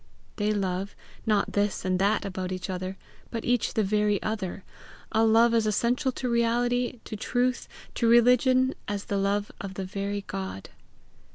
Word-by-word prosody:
They 210 -1 +1
love, 195 -1 -2 0.3
not 210 -2 +2
this 205 -1 0
and 185 -1 +1
that 200 +2 +2
about 185 -1 -4
each 185 +1 -4
other, 185 +1 -4 0.3
but 230 -2 -4
each 245 -2 +1
the 220 - +3
very 210 0 +2
other 205 -3 -3 0.5
a 220 - +3
love 225 +1 +5
as 225 -2 +3
essential 240 +5 +1
to 255 - -3
reality, 240 +1 +1
to - - -6
truth, 245 +3 0 0.3
to 230 - +1
religion, 250 +2 +5
as 205 -1 -3
the 200 - -1
love 200 +1 0
of 195 -1 -6
the 190 - -3
very 200 +2 -3
God. 190 - -6
210 Hz, 165 wpm, -27 LUFS, 195-235 Hz, 0.5 s, love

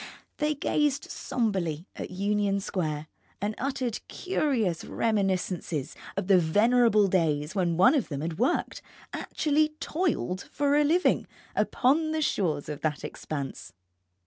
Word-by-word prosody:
They 300 0 +1
gazed 290 0 0
sombrely 185 - -1
at - - -5
Union 200 +1 0
Square, 155 -6 -2 0.3
and 205 +2 -1
uttered 260 -4 -2
curious 255 - 0
reminiscences 190 - -1 0.2
of - - 0
the 190 -1 +6
venerable 215 +5 +4
days 160 -4 +1
when 175 -4 0
one 245 +10 +6
of 280 -7 0
them 140 -2 -3
had 165 +2 -4
worked, 250 - 0 0.3
actually 305 0 0
toiled 305 - -1
for 285 0 +2
a 295 - +5
living, 335 +5 +2 0.3
upon 310 +5 +2
the 315 - 0
shores 160 - 0
of 150 -2 -5
that 150 -2 -1
expanse. 140 -3 -6
205 Hz, 130 wpm, -28 LUFS, 170-280 Hz, 0.3 s, the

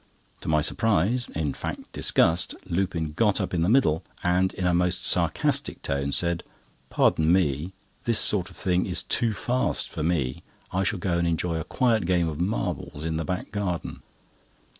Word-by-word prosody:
To - - -9
my 75 -1 +3
surprise, 115 +5 +1
in 75 -3 -1
fact - - -6
disgust, 80 +1 +3
Lupin 85 -3 -1
got 105 +3 +2
up 95 -3 -2
in 85 - +1
the 85 - +2
middle, 95 - +3 0.2
and, 90 +2 +2
in 95 - -2
a 90 - +3
most 90 +1 +1
sarcastic - - 0
tone, 70 0 -1
said: 85 +2 0 0.5
"Pardon 80 +1 +3
me, 85 -1 +1 0.3
this 115 -2 +3
sort 95 -4 +2
of - - -15
thing 90 -1 +1
is 90 -1 -1
too 115 -2 +1
fast 125 +4 -1
for - - -5
me, 75 -6 0 0.3
I 95 - 0
shall 95 +2 0
go 85 -1 0
and 85 - +1
enjoy 85 0 -1
a - - -3
quiet 115 -5 +1
game 90 -2 +2
of 80 0 -3
marbles 90 - -2
in 80 -1 -1
the 80 - -2
back 90 +4 -4
garden." 95 -4 -3
90 Hz, 180 wpm, -26 LUFS, 80-95 Hz, 0.5 s, my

